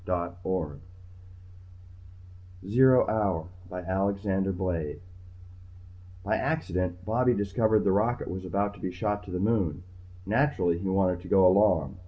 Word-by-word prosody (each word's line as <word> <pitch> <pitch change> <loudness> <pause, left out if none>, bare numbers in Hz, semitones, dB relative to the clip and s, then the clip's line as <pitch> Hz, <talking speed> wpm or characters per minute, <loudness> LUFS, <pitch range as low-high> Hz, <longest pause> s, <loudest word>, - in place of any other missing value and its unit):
net 90 -1 -1 2.4
ZERO 130 +4 +5
HOUR 95 -7 0 0.2
by 90 -1 -6
Alexander 95 +1 -1
Blade 90 -5 -3 1.3
By 110 +2 +1
accident 90 - -2
Bobby 120 +3 +2
discovered 105 +2 +1
the 95 - +2
rocket 110 +5 0
was 95 +1 -5
about 100 +2 -1
to - - -15
be 95 - -4
shot 105 +3 -2
to 95 - -9
the 90 - -2
Moon. 95 -6 0 0.4
Naturally 105 - +1
he 95 - -4
wanted 95 -2 +1
to 90 - -11
go 95 0 +5
along. 90 -6 +3
95 Hz, 130 wpm, -27 LUFS, 90-105 Hz, 2.4 s, ZERO